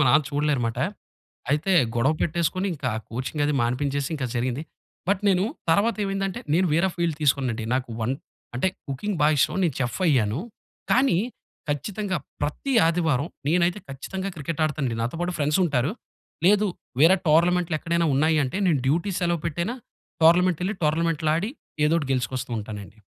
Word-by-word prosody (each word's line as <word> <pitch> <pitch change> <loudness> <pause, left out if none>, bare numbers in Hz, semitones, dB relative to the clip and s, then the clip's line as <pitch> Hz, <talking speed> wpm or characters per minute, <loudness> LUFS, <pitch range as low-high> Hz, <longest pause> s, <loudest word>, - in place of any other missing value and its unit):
మా 150 - +5
నాన్న 150 +4 +5
చూడలేరుమాట. 145 -6 0 0.7
అయితే 155 +7 +1 0.2
గొడవ 130 +6 +3
పెట్టేసుకొని 170 +4 0
ఇంకా 135 -4 -2 0.2
కోచింగది 145 +5 -1
మానిపించేసి 135 +3 0
ఇంకా 135 -4 -2
జరిగింది. 125 +4 -1 0.5
బట్ 200 0 +2
నేను 185 0 +3 0.3
తర్వాత 210 +6 +3
ఏమైందంటే, 195 -1 -2
నేను 185 +2 +3
వేర 170 +4 +3
ఫీల్డ్ 170 -3 0
తీసుకున్నానండి. 130 -5 +1
నాకు 130 -2 -2
వన్ 115 +4 0 0.4
అంటే 165 +9 +2 0.2
కుకింగ్ 165 +9 -3
బా 150 - +6
ఇష్టం, 140 - +2
నేను 160 -7 0
చెఫయ్యాను. 125 - +1 0.5
కానీ, 255 -9 +4 0.5
ఖచ్చితంగా 190 +6 -2 0.3
ప్రతి 150 - -2
ఆదివారం 165 -3 +1 0.2
నేనైతే 175 +4 +2
ఖచ్చితంగా 190 +8 -5
క్రికెట్ 155 +2 -4
ఆడుతానండి. 140 -6 -1
నాతో 125 +8 -3
పాటు 175 0 -1
ఫ్రెండ్సుంటారు, 150 -1 +1 0.5
లేదు 210 +1 +5 0.4
వేరే 180 +4 +7
టోర్నమెంట్లు 170 +1 +3
ఎక్కడైనా 170 0 0
ఉన్నాయి 155 +3 +3
అంటే 130 - -3
నేను 155 -6 +3
డ్యూటీ 170 +7 +1
సెలవు 170 -2 +1
పెట్టైనా 170 - -2 0.5
టోర్నమెంటెళ్లి, 180 +3 +4
టోర్నమెంట్‌లో 160 0 +1
ఆడి 200 +7 -1 0.4
ఏదోకటి 155 -3 +1
గెలుచుకొస్తూ 130 0 -2
ఉంటానండి. 105 0 -8
155 Hz, 140 wpm, -25 LUFS, 135-180 Hz, 0.7 s, వేరే